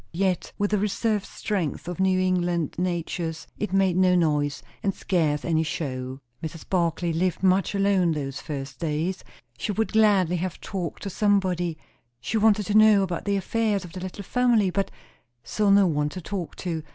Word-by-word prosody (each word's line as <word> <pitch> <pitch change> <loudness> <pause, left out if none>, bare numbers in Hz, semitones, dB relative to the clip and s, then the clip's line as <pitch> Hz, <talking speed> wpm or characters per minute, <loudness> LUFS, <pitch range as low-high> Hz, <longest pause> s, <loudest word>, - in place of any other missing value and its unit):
Yet, 185 0 0
with 205 0 0
the 210 - +2
reserved 210 0 0
strength 180 -7 -3
of 180 +1 -5
New 190 -1 +3
England 175 -3 0
natures, 170 -2 -2
it 210 - -2
made 190 -2 +3
no 185 0 +4
noise, 150 -4 +1 0.2
and 195 -1 -1
scarce 155 -5 0
any 160 -2 +2
show. 130 -4 -4 0.2
Mrs. 160 0 -7
Barclay 170 -2 0
lived 180 +2 -1
much 190 +2 +3
alone 195 -3 +3
those 135 -3 -4
first 135 -3 -6
days. 165 +3 -2 0.4
She 160 - -1
would 220 +2 -1
gladly 200 -5 +4
have 185 +1 -4
talked 180 -4 -5
to 200 - -4
somebody; 185 -5 +1 0.4
she 125 - -2
wanted 215 -1 +3
to 205 - -2
know 215 -2 +7
about 175 -3 -3
the 200 -1 +1
affairs 205 0 0
of 170 - -12
the 185 - -6
little 185 +2 -6
family, 230 -3 +2
but 195 +1 -1 0.5
saw 210 -1 0
no 200 0 +6
one 150 -3 +1
to 185 +4 -7
talk 180 0 -5
to. 165 -3 -3
185 Hz, 175 wpm, -25 LUFS, 165-200 Hz, 0.5 s, know